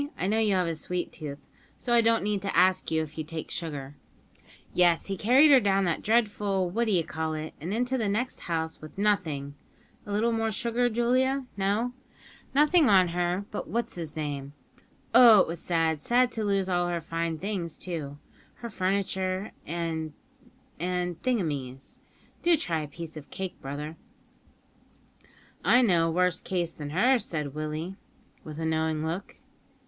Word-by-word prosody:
I - - -2
know 215 +3 +2
you 210 -3 +2
have 180 -1 +2
a 165 - -1
sweet 175 +3 -4
tooth, 145 -3 -7 0.4
so 240 - -1
I 235 - +6
don't 230 -1 +3
need 205 -1 0
to 195 - -2
ask 185 -1 +3
if 160 -1 -2
you - - -1
take 160 0 -7
sugar) 145 -4 -5 0.8
yes, 175 -2 +4
he 195 - -3
carried 260 +10 +5
her 270 - +8
down 195 -3 +2
that 170 -2 0
dreadful 205 -5 +1
what 235 +5 +1
d'ye 190 -7 +2
call 160 0 -3
it, 155 0 -5
and 170 +5 -4
into 250 +4 0
the 215 -3 0
next 235 +6 -2
house 160 -1 -3
with 155 +2 -11
nothing 165 -9 0 0.5
(A - - -5
little 220 +3 +2
more 225 -1 0
sugar, 240 +2 0
Julia? 255 +4 +1
No? 205 +5 0 0.3
) - - -23
nothing 300 +1 +5
on 190 -3 +6
but 170 - -4
her 175 +2 0 0.2
what's 235 +2 -2
'is 165 -4 -6
name. 145 -2 -4 0.6
Oh! 230 -4 +9
it - - +1
was 170 0 -5
sad; 165 -3 0
sad 245 +4 +3
to 220 - -3
lose 195 -2 +1
all 175 -1 +1
her 175 -1 -1
fine 165 0 -3
things, 180 -3 -4
too 150 -6 -5 0.4
her 235 -1 -8
furniture, 190 0 -1 0.2
and 160 -2 -3 0.7
and 180 0 -2
thingumies. 150 - -2 0.4
Do 345 -2 +4
try 170 - -1
a 150 - -5
piece 160 +2 -8
of 145 - -10
cake, 190 -1 -6
brother." 150 +4 -6 1.7
"I 250 +1 +5
know 170 -7 +3
a - - 0
worse 180 0 +1
case 175 -3 -2
than 150 -3 -7
hers," 235 - +3
said 150 -7 -4
Willie, 155 +5 -4 0.5
with 155 -1 -8
a 160 - -3
knowing 160 -1 0
look. 170 +5 -4
180 Hz, 175 wpm, -28 LUFS, 160-215 Hz, 1.7 s, Oh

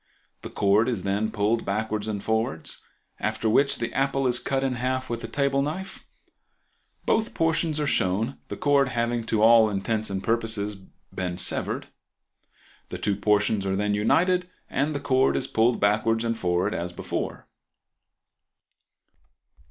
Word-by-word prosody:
The - - -7
cord 105 +4 +2
is 110 -7 -2
then 100 +2 0
pulled 110 +1 0
backwards 110 +1 -2
and 105 -2 -3
forwards, 110 -8 -2 0.4
after 110 +1 -1
which 140 +6 +3
the 115 0 -3
apple 135 +1 0
is 125 -1 +2
cut 135 0 -1
in 135 -1 0
half 130 0 -2
with 115 0 -4
a - - -4
table 140 +3 0
knife; 180 +7 -5 1.0
both 220 +1 0
portions 165 -1 +1
are 150 - 0
shown, 110 0 0
the - - -6
cord 140 -1 +3
having 120 -2 -1
to 110 -1 +1
all 115 -1 +7
intents 110 +2 -2
and 95 -1 -3
purposes 110 -2 0 0.4
been 90 -1 -3
severed. - - 0 1.0
The - - -5
two 100 -1 0
portions 105 0 +1
are 95 0 -1
then 105 +1 0
united 180 - +2 0.2
and 145 +3 0
the - - -1
cord 135 -1 +2
is - - -1
pulled 115 +2 +2
backwards 110 +2 +2
and 115 0 0
forwards 90 +1 0
as 85 +1 -4
before. - - -5
115 Hz, 150 wpm, -25 LUFS, 105-135 Hz, 1.0 s, all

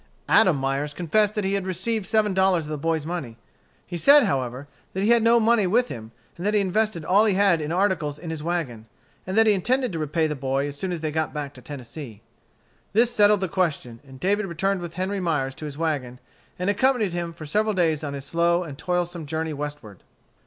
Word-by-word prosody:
Adam 185 -7 +5
Myers 135 +2 -2
confessed 205 +5 +1
that 210 - -1
he 195 - 0
had 195 -1 -1
received 195 +3 -2
seven 215 -2 +2
dollars 190 -3 +2
of 150 - -7
the 155 - -2
boy's 160 0 -1
money. 155 -9 -5 0.5
He 175 -1 -5
said, 285 - +7
however, 135 - -2 0.3
that 190 - -2
he 220 - +3
had 235 -1 +5
no 230 +1 +5
money 225 -3 +3
with 240 +6 +2
him; 110 -3 -8 0.3
that 205 +5 -1
he - - +5
had 200 - +1
invested 205 -3 -1
all 200 +4 +4
he 205 -4 +2
had 190 -4 +3
in 150 +1 -3
articles 175 -6 0
in 165 +1 -7
his 160 -2 -5
wagon, 150 -10 -3 0.4
and 190 +3 -2
that 225 - +6
he 215 - +5
intended 250 +6 0
to 165 - -3
repay 155 +2 0
the 155 - -1
boy 135 0 -1
as 145 - -6
soon 185 +5 -4
as 170 -3 -4
they 155 -1 -2
got 160 0 -2
back 145 -2 -4
to - - -13
Tennessee. 130 -5 -9 0.7
This 230 +3 +3
settled 210 -3 +4
the 190 - 0
question, 155 -10 -2
and 130 -2 -14
David 200 +5 0
returned 190 +2 -1
with 170 -1 -7
Henry 190 +2 -2
Myers 150 -7 -1
to 155 - -8
his 145 -1 -7
wagon, 140 -6 -2 0.4
and 180 - -3
accompanied 215 -2 +2
him 170 -1 -3
for 165 -2 -10
several 215 +7 0
days 160 -4 +1
on 140 -1 -4
his 140 -1 -7
slow 170 +3 +1
and 145 -4 -9
toilsome 175 -2 -2
journey 160 +1 -2
westward. 145 -9 -7
170 Hz, 225 wpm, -24 LUFS, 150-200 Hz, 0.7 s, said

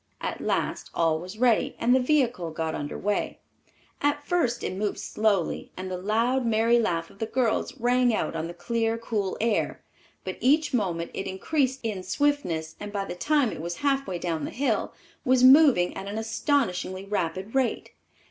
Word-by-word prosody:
At - - -4
last - - -1
all 160 -1 +2
was 185 +5 -8
ready, 240 -1 +2
and 240 +2 +3
the 260 - +5
vehicle 250 - +1
got 160 0 -3
under 145 0 -4
way. 205 +1 -1 0.6
At 290 0 0
first 255 -10 0
it - - -2
moved 205 +2 -2
slowly, 205 -5 0
and 185 0 -5
the - - -2
loud, 230 +7 +1
merry 230 +1 +3
laugh 170 -7 -1
of 200 - -20
the 225 - -2
girls 245 +2 0
rang 245 +1 +3
out 215 - -1
on 160 0 -2
the 170 - -8
clear, 225 +5 -1
cool 215 -4 -2
air; 225 -1 0 0.4
but 185 - -5
each 295 +5 +3
moment 175 -8 -1
it 195 - -4
increased 265 +7 -1
in 210 -4 -2
swiftness, 185 - -1
and 205 0 -6
by 200 -1 -2
the - - -5
time 285 +5 +1
it - - -6
was 170 +1 -4
half 275 -1 +2
way 180 - -3
down 165 -2 -2
the - - -3
hill, 250 -5 -1 0.3
was 255 0 +3
moving 260 - +6
at 195 +1 -6
an 205 +2 -4
astonishingly 220 - -1
rapid 190 0 -2
rate. 265 -2 0
220 Hz, 185 wpm, -26 LUFS, 185-255 Hz, 0.6 s, moving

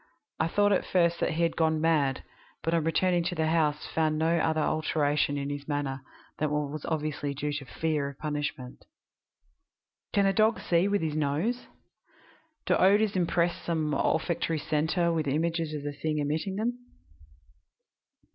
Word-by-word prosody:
I 160 - +2
thought 205 +4 +2
at 190 - +2
first 170 -2 +2
that - - 0
he 170 +2 0
had 165 - +1
gone 160 -1 +2
mad, 150 -5 +1 0.4
but 165 - 0
on 165 -2 +2
returning 175 +1 +2
to 180 0 -2
the 160 - 0
house 155 -2 +1
found 155 -1 0
no 165 +2 +2
other 160 -1 +1
alteration 150 -2 +1
in 140 0 -3
his 145 0 -6
manner 145 -2 -2 0.4
than 155 - +1
what 150 -1 -1
was 155 -1 -6
obviously 150 -2 -2
due 145 +1 -2
to 145 -1 -4
fear 150 +1 -1
of 140 - -12
punishment. 145 -4 -4 1.3
"Can 200 -1 +3
a 195 - +3
dog 220 +3 +3
see 175 +2 +2
with 200 -3 +1
his 155 -2 -1
nose? 155 - -1 1.0
Do - - +3
odors 205 +2 +4
impress 175 -1 +1
some 155 -3 -1
olfactory 165 +3 0
centre 160 +3 0
with 160 -3 -1
images 165 +2 0
of 145 - -5
the 145 0 -3
thing 150 +2 -2
emitting 155 +6 -1
them? 240 +4 -2
160 Hz, 165 wpm, -28 LUFS, 150-170 Hz, 1.3 s, odors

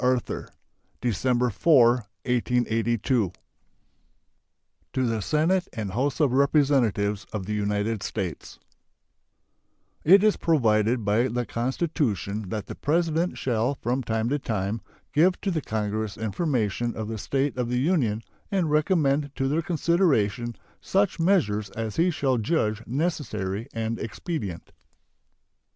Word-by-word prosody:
Arthur 125 -1 0 0.5
December 125 +1 +1
4, 130 +1 +5 0.4
1882 120 -3 +1 1.6
To 130 - +1
the 115 -2 -1
Senate 165 - +1
and 105 -5 -4
House 130 +9 -1
of 145 -5 +3
Representatives 130 -8 +2
of 105 -4 -4
the 105 - -3
United 105 +1 -1
States: 95 -5 -5 1.5
It 195 +5 +7
is 215 -1 +4
provided 115 -6 +2
by 110 +4 +3
the 120 0 -2
Constitution 115 - -2
that 105 0 -3
the - - -7
President 165 +2 0
shall 125 +2 0
from 125 0 -1
time 110 -2 -1
to 145 +2 0
time 110 -2 -2 0.3
give 180 +5 +4
to 195 - -1
the 160 -3 -1
Congress 110 -3 -3
information 115 - -1
of 110 -1 -4
the 110 -1 -4
state 135 +6 -1
of 125 -2 -2
the 125 0 0
Union 125 - +1 0.3
and 185 -7 0
recommend 150 -2 +2
to 135 -2 0
their 150 +4 +1
consideration 150 - +1 0.3
such 195 -2 +1
measures 110 - +2
as 110 0 -5
he 170 +2 +4
shall 135 -7 0
judge 110 -4 0
necessary 115 - -2
and 115 0 -3
expedient. 110 - -5
120 Hz, 125 wpm, -26 LUFS, 110-150 Hz, 1.6 s, It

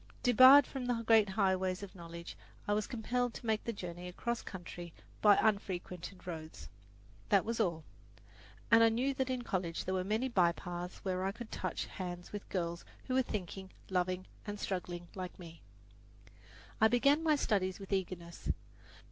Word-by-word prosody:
Debarred 255 +3 +9
from 260 -3 -5
the 235 -2 0
great 220 -2 +5
highways 190 -1 +1
of 195 - -8
knowledge, 170 -1 -8 0.3
I 205 - +2
was 210 0 0
compelled 245 +1 -1
to - - -8
make 220 -1 +1
the 235 - 0
journey 180 -4 -6
across 235 +6 -3
country 175 -2 -8 0.3
by 205 -1 +7
unfrequented 185 -3 -1
roads 160 -3 -7 0.6
that 200 -2 +4
was 230 +1 -2
all; 170 -7 0 0.9
and 230 0 +8
I 225 - +7
knew 250 +5 +1
that 265 -1 -1
in 255 -1 -1
college 180 -6 -2
there 185 - -1
were 185 -1 0
many 215 +6 0
bypaths 175 -4 0
where 185 -1 0
I 195 - 0
could 230 +2 -9
touch 185 -3 -3
hands 175 -1 -6
with 205 - -6
girls 170 -2 -2 0.2
who 255 - -3
were 260 - +4
thinking, 190 -5 -5 0.2
loving 185 0 0 0.2
and 205 0 -4
struggling 175 -3 -4
like 185 -2 -6
me. 165 -2 -11 1.2
I 220 - +8
began 275 +6 +4
my 315 -2 +4
studies 190 -9 0
with 195 0 -6
eagerness. 175 -3 -3
195 Hz, 165 wpm, -34 LUFS, 180-230 Hz, 1.2 s, Debarred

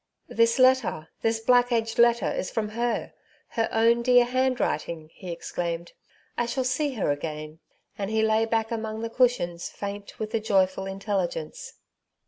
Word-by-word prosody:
" - - -47
This 230 +2 +4
letter— 255 -12 +3
this 225 0 +1
black 245 +2 +4
edged 225 -1 0
letter 235 0 +4
is 185 - -3
from 215 -2 -2
her— 235 +2 -2 0.4
her 225 -1 -1
own 230 +1 +3
dear 245 0 +5
handwriting/' 240 -11 -1
he 185 -3 -8
exclaimed; 170 0 -4 0.2
*^ - - -33 0.3
I 240 - +1
shall 260 +2 -1
see 265 +3 0
her 200 - 0
again! 155 +1 -5 0.2
" - - -42
and 200 0 -2
he 220 0 +1
lay 220 0 +3
back 225 0 -1
among 220 -1 -3
the 230 0 -4
cushions 230 -9 +1
faint 200 0 -7
with 215 0 -4
the 225 - +1
joyful 190 -3 +1
intelligence. 190 -5 -3
220 Hz, 170 wpm, -26 LUFS, 185-235 Hz, 0.4 s, dear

